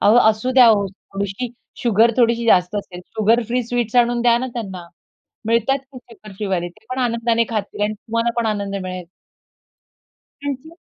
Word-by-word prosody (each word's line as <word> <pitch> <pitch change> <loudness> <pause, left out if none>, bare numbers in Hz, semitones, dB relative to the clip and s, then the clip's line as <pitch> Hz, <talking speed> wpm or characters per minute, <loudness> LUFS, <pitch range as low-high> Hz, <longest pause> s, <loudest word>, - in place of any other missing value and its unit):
अहो 215 +4 +5
असू 215 +4 -3
द्या 250 -2 +7
हो 205 -3 +4
थोडीशी 200 +4 -5 0.3
शुगर, 230 0 +4
थोडीशी 235 -1 +2
जास्त 180 -1 +4
असेल, 180 -3 -6
शुगर 225 +2 +2
फ्री 250 +1 0
स्वीट्स 240 -1 -1
आणून 240 0 +3
द्या 235 -1 +5
ना 260 - -3
त्यांना. 190 -7 -6 0.6
मिळतात 230 +4 +2
कुठेपण 230 -5 -13
शुगर - - -14
फ्रीवाले. 190 -4 -2
ते 175 - -23
पण 255 - -3
आनंदाने 235 -1 +1
खातील 210 -2 -4
आणि 210 +1 +1
तुम्हाला 230 +2 -2
पण 225 - -1
आनंद 200 -2 -2
मिळेल. 185 -1 -5 1.4
त्यांची. 285 +2 -5
230 Hz, 165 wpm, -20 LUFS, 200-240 Hz, 1.4 s, द्या